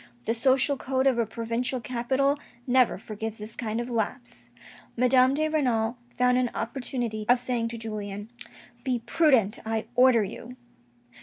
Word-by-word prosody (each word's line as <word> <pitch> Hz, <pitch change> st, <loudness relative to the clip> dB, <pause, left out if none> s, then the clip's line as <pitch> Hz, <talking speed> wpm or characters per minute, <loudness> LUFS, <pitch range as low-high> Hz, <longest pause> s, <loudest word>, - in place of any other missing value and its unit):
The 225 Hz, -, +1 dB
social 265 Hz, +4 st, +2 dB
code 260 Hz, 0 st, -1 dB
of 260 Hz, -3 st, +3 dB
a 230 Hz, -, +1 dB
provincial 235 Hz, +3 st, -2 dB
capital 260 Hz, +4 st, 0 dB, 0.3 s
never 255 Hz, -1 st, +3 dB
forgives 220 Hz, +2 st, -6 dB
this 215 Hz, +1 st, -7 dB
kind 225 Hz, -1 st, -3 dB
of 240 Hz, -, -3 dB
lapse. 225 Hz, -, -4 dB, 0.5 s
Madame 255 Hz, +2 st, +4 dB
de 310 Hz, +1 st, +1 dB
Renal 245 Hz, -7 st, +1 dB, 0.2 s
found 250 Hz, 0 st, +3 dB
an 250 Hz, -1 st, +1 dB
opportunity 235 Hz, -2 st, -3 dB
of 245 Hz, 0 st, +6 dB
saying 245 Hz, -2 st, -1 dB
to 230 Hz, 0 st, -6 dB
Julien, 210 Hz, -1 st, -6 dB, 0.3 s
" 240 Hz, 0 st, -23 dB
Be 250 Hz, -3 st, -1 dB
prudent, 255 Hz, -, +3 dB
I 220 Hz, 0 st, -2 dB
order 250 Hz, -3 st, +5 dB
you." 230 Hz, +5 st, -8 dB
240 Hz, 155 wpm, -27 LUFS, 225-255 Hz, 0.5 s, of